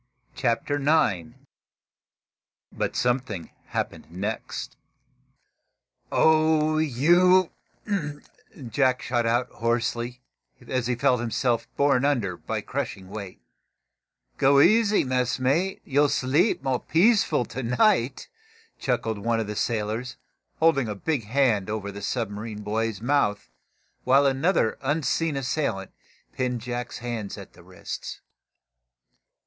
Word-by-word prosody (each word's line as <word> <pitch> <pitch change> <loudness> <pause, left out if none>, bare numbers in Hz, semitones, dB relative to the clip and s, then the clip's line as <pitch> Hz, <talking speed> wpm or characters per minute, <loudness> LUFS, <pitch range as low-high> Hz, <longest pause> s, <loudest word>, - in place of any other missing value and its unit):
CHAPTER 125 +3 0
IX 130 - +1 1.4
BUT - - -3
SOMETHING 120 -7 -1 0.2
HAPPENED - - -4
NEXT 100 +6 -5 1.4
"Oh, 155 0 +3
you 175 +6 +4 0.5
" 145 -3 -11
Jack 130 +2 +1
shot 120 -1 0
out, 120 +2 +1
hoarsely, 120 +1 -2 0.3
he 125 0 -2
felt 125 0 +2
himself 120 0 0
borne 140 -2 +3
under 120 -11 +1
by - - -4
crushing 95 -1 -5
weight. 100 -4 -8 0.9
"Go 140 +1 +5
easy, 215 +6 +5
messmate, 130 +8 0
and 135 - -14
you'll 145 +1 +4
sleep 140 - +1
more 130 -2 0
peaceful 170 - +3
to 125 +3 -6
night!" 125 - +1 0.5
chuckled 115 -4 -1
one 115 +2 0
of 110 - -1
the 105 0 -5
sailors, 110 +3 -2 0.4
holding 160 -6 +3
a 105 - -3
big 135 +2 -2
hand 115 -4 +1
over 105 -1 -3
the 100 0 -8
submarine 105 -1 -4
boy's 110 0 -2
mouth, 115 - 0 0.5
while 135 +2 +4
another 135 -1 +1
unseen 150 +2 0
assailant 125 -7 -2 0.4
pinned 125 -2 -1
Jack's 120 +1 -5
hands 115 -4 -5
at 100 - -11
the - - -16
wrists. 90 -1 -8
125 Hz, 110 wpm, -25 LUFS, 110-145 Hz, 1.4 s, Go